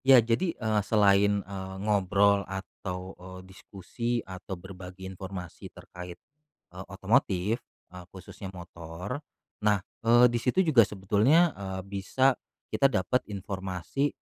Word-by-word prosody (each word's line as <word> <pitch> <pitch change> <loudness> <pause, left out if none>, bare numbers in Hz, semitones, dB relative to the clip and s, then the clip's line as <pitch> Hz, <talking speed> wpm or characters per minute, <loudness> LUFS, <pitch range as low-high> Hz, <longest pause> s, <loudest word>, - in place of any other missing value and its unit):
Ya, 135 -1 +9
jadi, 120 +10 +2
eee, 110 -2 +1
selain, 100 -1 +3
eee, 95 0 -6
ngobrol 100 0 +3
atau, 95 -1 -6
eee, 95 0 -9
diskusi 95 +5 -6
atau 95 0 -7
berbagi 95 0 -10
informasi 95 -2 -7
terkait, 90 0 -10 0.6
eee, 90 +1 -8
otomotif, 100 0 +1 0.6
khususnya 95 +1 -9
motor, 85 - -7 0.4
nah, 105 -3 +2 0.2
eee, 120 +1 +6
disitu 125 +10 +2
juga 155 -8 +6
sebetulnya, 105 - +3
eee, 95 -1 -5
bisa 100 +7 +2 0.4
kita 135 - +4
dapat 125 +1 +1
informasi, 95 - -2
100 Hz, 115 wpm, -28 LUFS, 95-115 Hz, 0.6 s, Ya